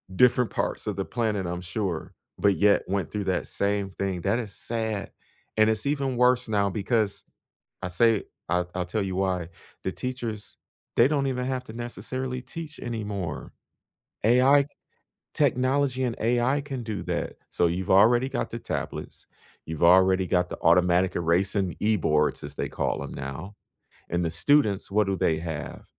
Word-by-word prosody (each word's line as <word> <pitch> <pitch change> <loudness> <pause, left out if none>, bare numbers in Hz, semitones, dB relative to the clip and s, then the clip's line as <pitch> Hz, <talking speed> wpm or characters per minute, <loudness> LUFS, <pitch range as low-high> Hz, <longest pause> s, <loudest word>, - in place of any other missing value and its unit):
different 125 +1 +4
parts - - -2
of - - -1
the - - -2
planet, 110 -5 -1
I'm 90 +1 -3
sure, 90 -3 -3 0.2
but 100 -2 +3
yet 100 0 +4
went 100 0 -1
through 105 -1 -2
that 95 -2 -1
same 100 -1 -1
thing. 95 -2 -3
That 100 +6 +1
is 105 -5 -5
sad. 110 -3 -3 0.5
And 110 0 +5
it's 110 +3 0
even 140 -3 0
worse 125 0 +4
now 100 -2 +2
because 105 +1 0 0.6
I - - -2
say 110 +4 +3 0.2
I'll 90 0 0
I'll 90 -1 -2
tell 105 +4 -1
you 95 -1 -3
why. 95 -3 0 0.3
The 95 - -2
teachers, 120 -5 -5 0.4
they - - +6
don't 140 -2 +1
even 125 -1 -1
have 130 -1 -2
to 110 - -10
necessarily 125 +2 -4
teach 160 +1 -8
anymore. 105 -8 -4 0.7
AI 130 +5 +5 0.7
technology 130 -1 +2
and 120 -2 -1
AI 120 +5 +2
can 135 -3 -5
do 110 -2 -4
that. - - -2 0.2
So 85 - +2
you've 90 +2 -2
already 120 +7 +5
got 135 - -2
the 115 - -5
tablets. - - -5 0.4
You've 80 +1 -4
already 95 +1 +6
got 90 0 +1
the - - -5
automatic 90 +1 +4
erasing 90 +2 +1
e-boards, 75 -11 +2
as 70 0 -7
they - - -2
call - - -2
'em - - -7
now, 70 +10 -6 0.6
and 85 +1 0
the 80 - 0
students, 100 - +2
what 105 0 +2
do 95 - 0
they 80 -3 +1
have? 80 -3 -6
105 Hz, 165 wpm, -26 LUFS, 90-125 Hz, 0.7 s, they